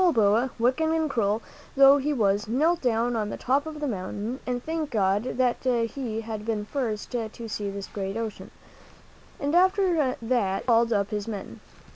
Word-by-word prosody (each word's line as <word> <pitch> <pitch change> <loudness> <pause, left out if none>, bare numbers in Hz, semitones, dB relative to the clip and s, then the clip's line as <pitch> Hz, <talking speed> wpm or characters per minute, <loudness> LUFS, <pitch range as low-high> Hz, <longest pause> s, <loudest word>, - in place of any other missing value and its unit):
Then 350 -3 +4
Balboa, 225 +3 +3
wicked 255 +7 +2
and 320 -1 +1
cruel 225 -5 0 0.3
though 275 +1 +8
he 290 +2 -1
was, 210 -6 +1
knelt 310 +9 +2
down 240 -1 +1
on 215 -2 -1
the - - -5
top 275 +4 +1
of 310 -1 -6
the 295 - -2
mountain 210 +3 -4
and 245 -1 -2
thanked 320 -3 -3
God 205 +2 0
that 250 -2 +2
he 235 -2 -1
had 220 -1 -6
been 220 -1 -1
the - - -7
first 220 -4 -3
to 230 -1 -4
see 205 -2 -3
this 200 0 -5
great 195 +1 -4
ocean. 225 -2 -5 0.9
After 345 -2 +2
that 225 -5 0
he - - -20
called 235 -1 +3
up 200 -2 +1
his 210 0 -3
men. 205 -4 -6
235 Hz, 185 wpm, -26 LUFS, 210-275 Hz, 0.9 s, though